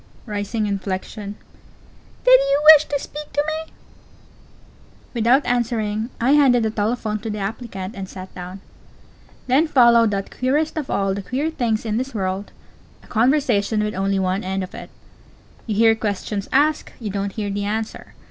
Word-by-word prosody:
(Rising 210 0 -2
inflection.) 200 +1 -4 0.9
Did - - +7
you 275 +1 +1
wish 305 0 +4
to 285 - -2
speak 300 +2 -8
to 290 +1 +1
me? 315 +1 -4 1.4
Without 245 +4 +3
answering, 225 -2 -1
I 245 +3 +2
handed 270 -5 +5
the 220 - 0
telephone 215 0 -1
to 220 +2 -6
the 210 - -3
applicant, 200 -1 -5
and 195 -4 -7
sat 185 0 -9
down. 185 +1 -8 0.8
Then 270 +6 +3
followed 235 -5 +5
that 195 -1 -4
queerest 290 +5 0
of 300 -3 -4
all 195 -1 0
the 200 - -4
queer 275 +10 -2
things 235 -7 -1
in 215 -1 -1
this 260 +1 -4
world 190 0 -3 0.5
a - - -18
conversation 225 -4 +2
with 210 0 -2
only 195 +1 0
one 190 +1 0
end 190 0 -2
to - - -11
it. - - -9 0.8
You 215 - -1
hear 225 +1 +5
questions 205 -2 -3
asked; 300 +3 +2
you 215 -4 -4
don't 200 0 -3
hear 205 -2 -3
the 200 0 -2
answer. 220 +2 -4
220 Hz, 165 wpm, -21 LUFS, 200-255 Hz, 1.4 s, Did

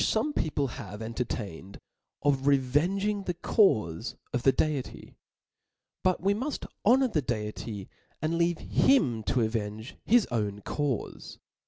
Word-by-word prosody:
forac 290 +7 +1
people 145 - 0
have 105 -4 -8
entertained 110 -5 -5 0.4
of 140 -1 +2
revenging 170 +10 +2
the 180 - -2
caufe 110 - +2 0.2
of 125 - 0
the 135 - +5
Deity. 145 -2 -2 0.9
But 185 -1 +2
we 195 +2 +3
muft 260 +8 -3 0.2
honor 260 +5 +5
the 155 -9 +1
Deity, 105 -4 -4 0.4
apd 160 +2 +1
leave 170 0 +2
him 135 - +3
to 125 - +1
avenge 110 +1 -3
his 235 -1 +4
own 105 -3 -1
caufe. 140 0 -3
135 Hz, 130 wpm, -28 LUFS, 110-180 Hz, 0.9 s, the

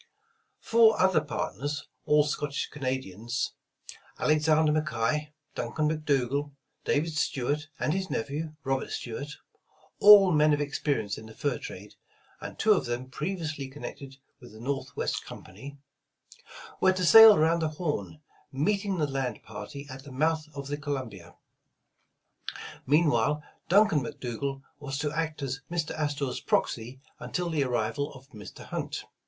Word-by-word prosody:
Four 225 -1 +5
other 185 -4 +4
partners, 145 0 -4 0.2
all 150 0 +5
Scottish 145 -1 -2
Canadians, 130 -5 -3 0.6
Alex 155 +1 +2
ander 155 0 +4
McKay, 150 0 0 0.2
Duncan 155 -1 -1
McDougal, 145 -2 0 0.3
David 155 +2 0
Stuart 150 +1 -1
and 155 - 0
his 190 0 -2
nephew, 150 +6 -3
Robert 135 0 -1
Stuart, 140 +5 -5 0.3
— - - -33
all 205 -3 +9
men 150 -1 +4
of - - -5
experience 140 -8 -1
in 110 - -11
the 110 - -13
fur 140 -5 -1
trade, 100 +3 -9 0.5
and - - -8
two - - +3
of - - 0
them 125 +2 -4
previously 155 -3 -3
connected 135 0 -9 0.2
with 120 -4 -14
the 110 - -12
Northwest 135 +2 -3
Company, 135 +10 -10 0.5
— - - -16
were 190 0 +5
to 185 -1 -1
sail 225 +3 +10
around 165 +2 +3
the 160 -1 0
Horn, 155 -1 -4 0.3
meeting 195 +7 0
the 155 - +2
land 135 -5 -3
party 140 0 -8
at 135 -1 -9
the 140 - -11
mouth 155 +3 0
of 140 -1 -5
the 145 +1 -3
Co 145 0 -3
lumbia. 100 -10 -7 1.5
Meanwhile, 150 -1 +3 0.3
Duncan 200 -3 +5
McDougal 135 +3 -4 0.2
was 140 -2 -4
to 145 +1 -1
act 155 -1 -3
as 135 +1 -3
Mr. 165 -2 -2
Astor 145 -2 -1
's - - -4
proxy 120 +3 -1 0.2
until 180 -1 -3
the 150 -3 +1
arrival 125 +3 -1
of 130 0 -14
Mr. 105 -3 -11
Hunt. - - -4
145 Hz, 150 wpm, -28 LUFS, 130-155 Hz, 1.5 s, sail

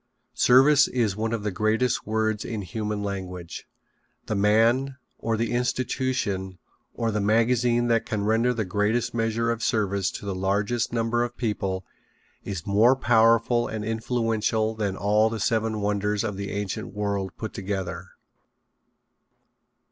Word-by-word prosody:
Service 135 +3 +5
is 115 -6 0
one 110 +1 -2
of 115 -3 -2
the 105 - -1
greatest 110 +6 0
words 110 -1 0
in 110 -3 -4
human 105 +3 -3
language. 90 -3 -6 0.6
The - - -2
man, 115 +6 +2 0.2
or 115 -1 -1
the 115 +1 -1
institution, 120 -6 -1 0.4
or 115 -1 -1
the 105 -1 -1
magazine 120 +3 +2
that 115 -1 +1
can 105 -2 -2
render 115 +3 +2
the 115 -3 -2
greatest 110 +5 0
measure 115 0 0
of 115 0 -3
service 100 -4 0
to - - -7
the 100 - -2
largest 100 +5 0
number 115 0 0
of 120 0 -5
people 95 -5 -2 0.6
is 95 -3 -5
more 110 +6 +4
powerful 115 -1 +3
and 110 -1 -4
influential 110 -1 0
than 100 -3 -2
all 105 +2 +3
the 115 0 -4
seven 110 0 0
wonders 105 0 0
of 105 -3 -3
the 100 +1 -5
ancient 105 +1 -4
world 100 -2 -2
put 110 - -5
together. 95 -2 -4
110 Hz, 145 wpm, -25 LUFS, 100-115 Hz, 0.6 s, Service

